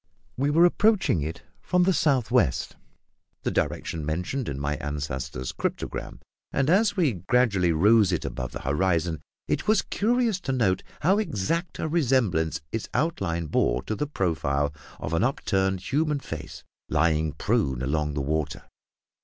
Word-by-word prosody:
We 140 +3 +1
were 165 +4 +5
approaching 195 - +3
it 80 +4 -5 0.2
from 180 0 +2
the 190 +1 +3
south 135 -9 +2
west 90 - +1 0.7
the - - 0
direction 80 -2 -2
mentioned 90 - -2
in 70 -1 -4
my 75 +1 -1
ancestor's 65 -4 -4
cryptogram - - -4 0.3
and 135 +3 +1
as 205 +2 +3
we 160 -9 +3
gradually 95 -1 +2
rose 100 +4 +5
it 85 - -1
above 60 +1 -4
the - - -6
horizon 80 +1 0 0.3
it - - -1
was 215 -1 +4
curious 230 -2 +1
to 145 - -3
note 110 -8 +1 0.2
how 190 +7 +3
exact 170 - -2
a - - -2
resemblance 115 - +1
its 115 - -3
outline 95 - 0
bore 60 -4 +1
to - - -3
the 150 +7 -2
profile 75 - 0 0.3
of 80 - -4
an 85 - +2
upturned 95 -7 0
human 150 +1 +1
face 80 - -8 0.3
lying 80 -1 +2
prone 75 - 0
along 75 +2 -1
the 75 - -1
water. 75 0 -2
95 Hz, 155 wpm, -26 LUFS, -, 0.7 s, were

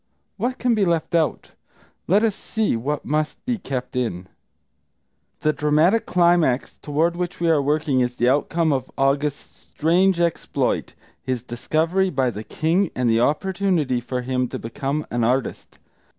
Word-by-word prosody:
What 255 +2 -2
can 245 -1 +1
be 215 -3 +2
left 170 -1 0
out? 165 -2 0 0.6
Let 200 +5 +4
us 225 -2 +2
see 220 - -1
what 140 +6 -3
must 155 +1 -2
be 245 -3 -1
kept 130 -6 -5
in. 105 -8 -2 1.2
The 155 - +2
dramatic 155 +10 +2
climax 170 -7 +2
toward 160 +4 0
which 175 0 -4
we 170 - 0
are 155 -3 +3
working 145 -1 +1
is 125 0 0
the 120 - +1
outcome 150 +4 +2
of 130 -2 -2
August's 140 +1 0
strange 175 +3 +1
exploit, 170 -1 -1 0.3
his 125 -2 -3
discovery 160 +10 0
by 130 -7 0
the 105 0 -7
king 165 - 0
and 125 -2 +1
the 115 - +3
opportunity 160 -2 +1
for 125 +1 -4
him 125 0 -1
to - - -5
become 135 +6 -3
an 120 0 0
artist. 125 +2 -1
150 Hz, 155 wpm, -22 LUFS, 125-175 Hz, 1.2 s, Let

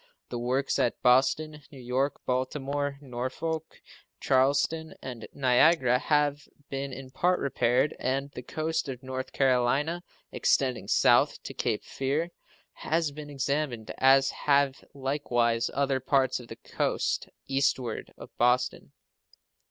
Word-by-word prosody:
The 120 - -4
works 130 +3 0
at 120 - +1
Boston, 150 +5 +3
New 140 - -12
York, 130 +3 -1
Baltimore, 140 +2 -2
Norfolk, 140 +5 -4 0.4
Charleston, 140 +4 +1
and 125 -4 -7
Niagara 130 0 +4
have 145 -1 +1 0.2
been 135 0 -3
in 130 0 -9
part 180 +6 +1
repaired, 130 +1 +1
and 135 +2 -1
the 125 - -7
coast 160 +3 -2
of 130 0 -6
North 130 0 -5
Carolina, 135 +6 +1 0.3
extending 130 -3 +1
south - - +3
to - - -7
Cape - - -1
Fear, 145 +6 -2 0.4
has 165 -2 -1
been 150 0 -9
examined, 140 -4 -2
as 135 +1 +5
have 140 -2 +1
likewise 120 -4 0
other 135 -1 0
parts 130 -1 +1
of 120 - -11
the - - -8
coast - - -2 0.2
eastward 135 -4 -1
of - - -12
Boston. 125 +1 +1
135 Hz, 125 wpm, -28 LUFS, 125-145 Hz, 0.4 s, as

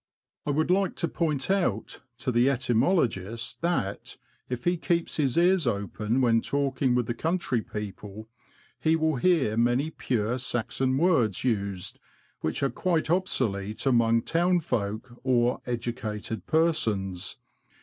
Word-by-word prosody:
I - - 0
would 155 +4 +1
like 190 0 +2
to 170 - -1
point 155 -2 -1
out 175 - -1 0.2
to 125 +1 -2
the 120 +2 +4
etymologist 115 - 0
that, 165 - -2 0.3
if 125 -1 -4
he 175 +1 +2
keeps 170 0 -1
his 140 -3 +1
ears 175 -3 +4
open 105 +3 -1
when 115 -2 +4
talking 135 -2 0
with 125 -1 +1
the 120 - -2
country 155 -3 -1
people, 105 0 -7 0.5
he 160 0 +3
will 160 -3 +1
hear 140 -7 +2
many 120 +6 +2
pure 120 -3 -1
Saxon 130 +1 0
words 135 - +2
used, 100 -6 -2 0.4
which 80 - -2
are 135 - +1
quite 165 +2 0
obsolete 110 - 0
among 115 -3 +3
town 175 +1 +2
folk 115 -3 -3
or 125 -2 +2
educated 115 -3 -4
persons. 110 - 0
125 Hz, 135 wpm, -27 LUFS, 110-160 Hz, 0.5 s, the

